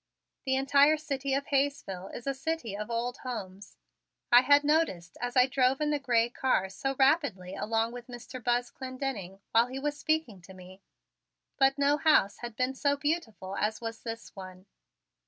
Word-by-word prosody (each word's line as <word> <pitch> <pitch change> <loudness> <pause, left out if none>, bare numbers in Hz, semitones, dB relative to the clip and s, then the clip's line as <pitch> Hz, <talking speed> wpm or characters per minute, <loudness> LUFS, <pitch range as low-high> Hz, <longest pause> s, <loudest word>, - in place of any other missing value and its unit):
The 265 -1 +1
entire 280 +3 +4
city 275 -3 -2
of 275 0 -1
Hayesville 270 -10 -1
is 235 - -9
a 275 - 0
city 270 -6 -3
of 210 +2 -5
old 240 +2 -2
homes, 200 -6 -7 0.5
I 245 0 +9
had 285 +2 +5
noticed 290 - 0
as 245 +1 -2
I 250 - +7
drove 260 0 +2
in 300 0 0
the 295 - 0
gray 235 -4 +2
car 240 -6 0
so 270 +8 -3
rapidly 265 - +2
along 225 +2 -1
with 245 -1 -9
Mr. 245 0 -9
Buzz 245 +1 0
Clendenning 255 -8 -5
while 230 +1 +4
he 260 +1 -6
was 295 +2 -2
speaking 310 - -1
to 185 +2 -14
me, 185 +1 -13 0.8
but 270 0 +4
no 285 +1 +3
house 300 -11 +3
had 240 -2 -7
been 255 +3 0
so 285 +1 0
beautiful 275 - -3
as 215 +1 -1
was 230 0 -6
this 230 0 -7
one. 185 -1 -10
250 Hz, 175 wpm, -29 LUFS, 215-280 Hz, 0.8 s, I